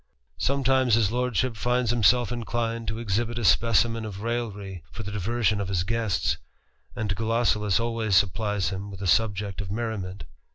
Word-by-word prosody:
Sometimes 130 - +3
his 110 -3 +2
lordship 125 0 0
ids 125 -2 +2
himself 120 +1 +3
inclined 115 -1 -2
to 110 - -2
exhibit 115 +1 -1
a 120 - -2
specimen 115 +4 +3
of 100 -3 -6
raillery 105 -6 -4
for 110 - -7
le 100 - -5
diversion 105 +1 0
of 100 - -3
his 90 -3 0
guests, 110 0 0 0.6
and 105 -3 -2
Gulosulus 110 -2 +1
always 115 -3 0
supplies 105 +1 +1
m 95 +2 -5
with 100 0 -8
a - - -2
subject 100 0 +1
of 95 - -6
merriment. 100 -4 -4
110 Hz, 160 wpm, -26 LUFS, 100-120 Hz, 0.6 s, Sometimes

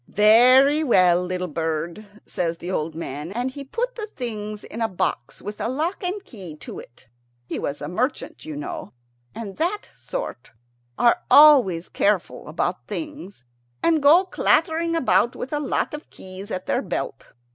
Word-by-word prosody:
"Very 255 +8 +6
well, 180 - +4
little 180 0 -3
bird," 165 +5 -3 0.2
says 170 -3 -2
the 175 +2 -6
old 160 -2 -2
man, 150 0 -5
and 245 +5 -2
he 280 +1 -7
put 480 - -3
the 435 -2 -6
things 215 - -5
in 230 - -7
a 225 - +2
box 175 - -3
with 205 +1 -6
a - - 0
lock 320 +10 -2
and 380 +2 -3
key 185 - -9
to 150 - -9
it. 120 - -15 0.4
He - - -4
was 145 - -4
a 145 - -4
merchant, 235 - -3
you 310 -1 -6
know, 320 +1 -6 0.4
and 205 -4 -7
that 370 +6 -2
sort - - -6 0.4
are 235 - +4
always 255 - +7
careful 200 -3 0
about - - -2
things, 285 - -7 0.4
and 325 -2 +3
go 310 +6 +7
clattering 335 -2 +1
about 255 -5 +2
with 265 - -6
a 295 - 0
lot 295 - -1
of 300 +1 -8
keys 190 +2 -10
at 185 -3 -4
their - - 0
belt. - - -5
230 Hz, 170 wpm, -23 LUFS, 180-300 Hz, 0.4 s, always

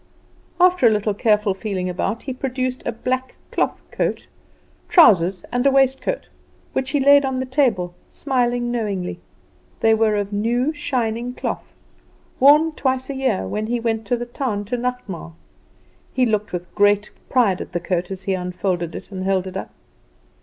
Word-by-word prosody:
After 360 -7 +5
a - - +7
little 210 -1 +1
careful 210 -2 +2
feeling 190 -2 -3
about, 185 +5 -2
he 265 - -4
produced 255 0 -3
a - - +1
black 255 +3 -3 0.2
cloth - - -1
coat, - - -1 0.6
trousers, 190 - +5
and 245 0 +1
waistcoat, 270 - +1 0.5
which 265 0 -1
he 285 - +1
laid 285 +1 +6
on 265 -1 -1
the 260 - -2
table, 240 -10 +1 0.2
smiling 245 -3 0
knowingly. 205 -6 -2 0.6
They 225 0 +5
were 220 -1 +3
of 205 0 -2
new 240 +8 +1
shining 245 -4 -2
cloth, - - -5 0.6
worn 300 +4 +6
twice 260 -2 -1
a - - -5
year, 260 - 0
when 215 - -3
he 240 +1 0
went 225 -2 -2
to 245 - +1
the 240 - -4
town 240 -4 -3
to 225 - -2
nachtmaal. 240 -9 -4 0.8
He 255 -1 +2
looked 215 -2 0
with 180 -1 -6
great 205 +1 +3 0.2
pride 220 -8 +2
at - - -7
the 175 - -1
coat 175 0 -2
as 190 -1 -6
he 195 - 0
unfolded 180 -2 -2
it - - -9
and 185 -1 -4
held 190 -1 +1
it 185 -1 -7
up. 190 - -4
230 Hz, 165 wpm, -21 LUFS, 195-260 Hz, 0.8 s, a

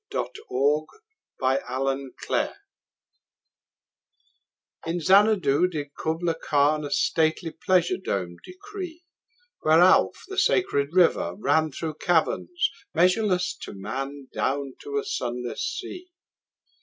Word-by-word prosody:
Kubla 150 - -1 0.5
Khan 135 0 -1 2.4
IN 170 +2 -1
Xanadu 190 -3 +4
did 145 -5 -6
Kubla 165 +1 -1
Khan 150 -1 +1
A 145 - -4
stately 160 +3 +1
pleasure 175 +1 +1
dome 90 - -3
decree: 370 -3 -9 0.6
Where 155 +1 +4
Alph, 185 +1 +4
the 390 - -2
sacred 140 - +2
river, 180 -2 +3
ran 160 -6 +2
Through 155 +2 -5
caverns 175 - +1 0.2
measureless 180 +1 +2
to - - -8
man 135 +7 -5
Down 140 -1 -1
to 425 0 -4
a 425 - 0
sunless 125 - -3
sea. 365 -1 -5
160 Hz, 100 wpm, -25 LUFS, 140-185 Hz, 2.4 s, Xanadu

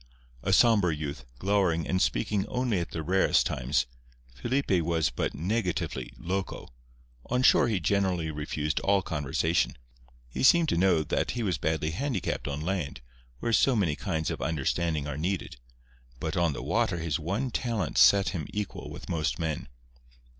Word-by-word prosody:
A 95 - -1
sombre 105 -4 +5
youth, 70 -4 -5
glowering, 95 -2 +1
and 95 0 +1
speaking 95 - 0
only 125 -6 0
at 85 - -3
the 80 - -4
rarest 95 +4 +3
times, - - 0 0.5
Felipe 95 - 0
was 80 -1 +1
but - - -2
negatively 90 +4 -2
"loco." 95 +3 -4 0.6
On 125 +1 +1
shore 125 - +6
he 110 -5 0
generally 90 -2 0
refused 75 0 -2
all 100 -1 +2
conversation. 80 +1 0 0.5
He - - -5
seemed 165 +4 +5
to - - +1
know 85 -2 +3
that - - -1
he 120 - -1
was 95 -5 -1
badly 80 0 0
handicapped 120 - -2
on 70 +1 -3
land, 85 -5 -3 0.4
where 115 - 0
so 130 +3 +4
many 90 -9 +1
kinds 80 -3 -2
of - - -5
understanding 80 0 -1
are 75 0 -4
needed; 90 -4 -2 0.6
but 80 +2 -3
on 85 -4 +2
the - - -6
water 85 - +1
his 80 -3 -1
one 100 - -2
talent 110 - -1
set 95 +10 +6
him 80 -6 -4
equal 105 -1 -4
with - - -9
most 75 -6 -1
men. 80 -4 -3
85 Hz, 160 wpm, -28 LUFS, 80-100 Hz, 0.6 s, shore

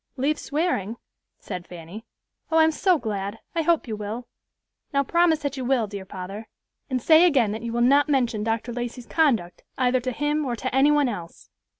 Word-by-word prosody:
"Leave 290 +4 0
swearing?" 280 - -1 0.4
said 180 -1 -7
Fanny. 175 +5 -9 0.5
"Oh, 325 - +2
I'm 320 0 +5
so 360 +3 +2
glad. 205 -4 -4 0.2
I 335 - +1
hope 325 -3 +1
you 220 - -3
will. 215 +4 -6 0.6
Now 280 -1 +2
promise 340 +2 +3
that 280 -1 -2
you 260 - -3
will, 250 -2 +2
dear 200 -2 -7
father, 195 +3 -7 0.4
and 260 -1 0
say 315 +6 +6
again 270 -12 +4
that 220 +1 -4
you 235 0 -4
will 240 +1 -1
not 285 +4 +4
mention 240 -6 +1
Dr. 225 +2 -2
Lacey's 245 0 -5
conduct 235 - +1 0.2
either 255 0 +2
to 255 +1 -3
him 295 +4 -1
or 250 -4 -2
to 255 +2 -4
any 270 +2 +5
one 295 -2 +3
else." 175 -8 -7
250 Hz, 195 wpm, -24 LUFS, 215-295 Hz, 0.6 s, say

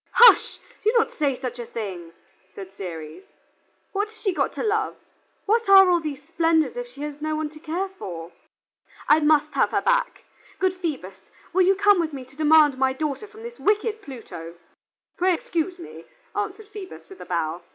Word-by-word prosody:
"Hush! 475 0 +7 0.3
do 435 - +4
not 450 - +2
say 285 -4 0
such 250 -2 -5
a 240 - -5
thing," 180 -7 -6 0.4
said 195 -1 -9
Ceres. 165 - -7 0.7
"What 410 +1 -1
has 435 0 -17
she 390 -4 0
got - - 0
to - - -4
love? 430 -1 0 0.5
What 450 0 +1
are 385 -2 +8
all 350 - +4
these 295 -3 -6
splendors 325 +2 +1
if - - -5
she 290 - -13
has 295 0 -6
no 310 0 -1
one 310 -1 -2
to 305 - -13
care 340 +5 -2
for? 175 - -8 0.8
I 300 - +6
must 300 -1 +3
have - - +2
her - - 0
back. - - +1 0.3
Good 375 -1 +1
Phoebus, 280 - -5 0.4
will 375 - +4
you 390 - +5
come 405 -1 +4
with 320 -3 -1
me 265 -2 -7
to 260 +2 -20
demand 305 -3 +5
my 265 0 +2
daughter 300 +8 -3
from 440 +1 -14
this 475 0 -9
wicked 430 +1 +1
Pluto?" 220 - -9 0.6
"Pray 365 0 +3
excuse 340 +2 -3
me," 345 - -11 0.3
answered 435 -2 -4
Phoebus, 405 -3 -10
with 385 - -13
a - - -8
bow. 170 -1 -2
320 Hz, 190 wpm, -24 LUFS, 265-395 Hz, 0.8 s, are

